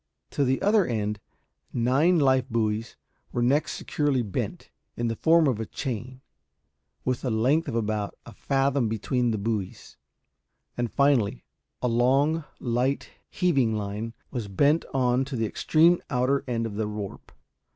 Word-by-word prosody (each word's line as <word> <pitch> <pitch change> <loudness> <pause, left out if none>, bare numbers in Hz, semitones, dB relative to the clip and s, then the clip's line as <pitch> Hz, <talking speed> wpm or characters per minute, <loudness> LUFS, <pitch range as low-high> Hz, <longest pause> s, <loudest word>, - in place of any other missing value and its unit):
To 145 - +1
the 130 0 +1
other 205 0 +4
end 105 - -2 0.5
nine 135 +9 +3
life 130 -3 +3
buoys 110 0 -1 0.4
were 120 - 0
next 140 +5 +2
securely 145 -4 0
bent, 100 -4 -4 0.3
in 120 0 0
the 115 - -2
form 165 +5 +4
of 125 -6 +1
a 110 - -2
chain, 130 +1 -5 0.8
with 130 -1 -1
a 130 - 0
length 130 +9 +2
of - - -3
about 105 -2 -2
a - - -11
fathom 135 -3 +1
between 120 +3 0
the 110 - 0
buoys; 105 -2 -4 0.8
and, 120 -2 -2
finally, 125 - +2 0.4
a - - +3
long 135 +7 +2
light 125 +3 -1 0.2
heaving 135 -11 +1
line 105 +3 -4 0.2
was 120 -6 -4
bent 145 - +2
on 125 -1 +2
to 135 0 -5
the 115 -2 0
extreme 165 - +3
outer 130 +3 +1
end 115 -2 -1
of 105 -2 -5
the 110 -1 -1
warp. 105 -2 -7
125 Hz, 150 wpm, -26 LUFS, 110-140 Hz, 0.8 s, other